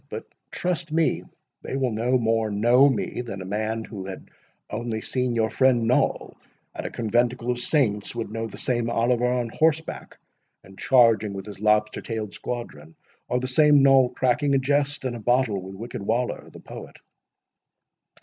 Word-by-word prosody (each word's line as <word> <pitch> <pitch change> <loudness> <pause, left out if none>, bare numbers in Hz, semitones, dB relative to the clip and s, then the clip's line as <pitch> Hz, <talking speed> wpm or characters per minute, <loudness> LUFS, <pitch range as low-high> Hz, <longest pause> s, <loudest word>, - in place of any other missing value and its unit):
But - - -6 0.2
trust 175 -3 -3
me, 165 0 +1 0.4
they - - -5
will 130 -3 0
no 120 +4 +1
more 115 -2 +1
know 120 +7 +4
me, 125 -1 -2
than 110 -6 -7
a 95 - -7
man 110 +3 -2
who 100 -4 -8
had 95 - -9 0.4
only 115 0 -4
seen 125 +1 -2
your 110 -1 +1
friend 130 -3 +3
Noll 125 - 0 0.4
at - - -5
a - - -5
conventicle 120 +2 0
of 120 - -3
saints, 120 -7 0
would 115 -3 -4
know 115 0 -3
the 110 - -11
same 120 -2 -1
Oliver 120 +1 +1
on 125 -2 -1
horseback, 160 +4 -1 0.5
and 95 - -15
charging 115 -4 +3
with 95 -1 -7
his 105 -2 -10
lobster 105 0 +2
tailed 110 -3 -5
squadron; 80 -11 -7 0.3
or 125 - +1
the 130 - -4
same 145 +1 +5
Noll 135 -2 +6
cracking 140 +3 +1
a - - +5
jest 140 +1 0
and 125 -2 -2
a - - -6
bottle 120 -3 +1
with 95 +1 -9
wicked 115 +1 -7
Waller 115 +5 -2
the - - -13
poet." - - -10
120 Hz, 175 wpm, -24 LUFS, 110-130 Hz, 0.5 s, Noll